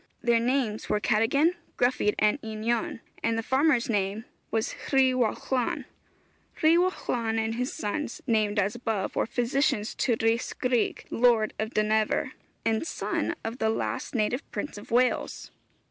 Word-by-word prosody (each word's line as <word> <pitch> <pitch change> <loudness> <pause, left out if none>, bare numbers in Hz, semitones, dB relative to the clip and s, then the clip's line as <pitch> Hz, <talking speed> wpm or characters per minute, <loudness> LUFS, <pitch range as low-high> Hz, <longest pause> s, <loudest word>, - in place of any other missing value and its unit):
Their 235 -1 +3
names 240 -3 0
were 210 - +2
Cadogan, 240 - +3 0.2
Gruffydd 245 -4 +2
and 215 +7 +2
Einion, 220 +1 -2 0.2
and 225 0 +1
the 225 - -1
farmer's 265 0 +2
name 205 0 -1 0.2
was 225 -1 -1 0.2
Rhiwallon. 255 -1 +1 0.8
Rhiwallon 315 -9 +2
and 220 0 0
his 250 +3 -2
sons, 250 +9 -3
named 215 -4 +1
as 200 +1 +2
above, 225 -5 -2
were - - +1
physicians 245 -1 0
to 240 - +1
Rhys 225 +1 +1
Gryg, 250 -2 0
Lord 230 -2 +3
of 220 +2 -3
Dynevor, 215 0 +1 0.3
and 225 +7 +1
son - - -2
of 225 +3 -5
the 220 - +2
last 225 - -2
native 240 +4 +1
prince 290 - -4
of 205 - -13
Wales. 250 +2 +1
230 Hz, 140 wpm, -27 LUFS, 220-255 Hz, 0.8 s, Their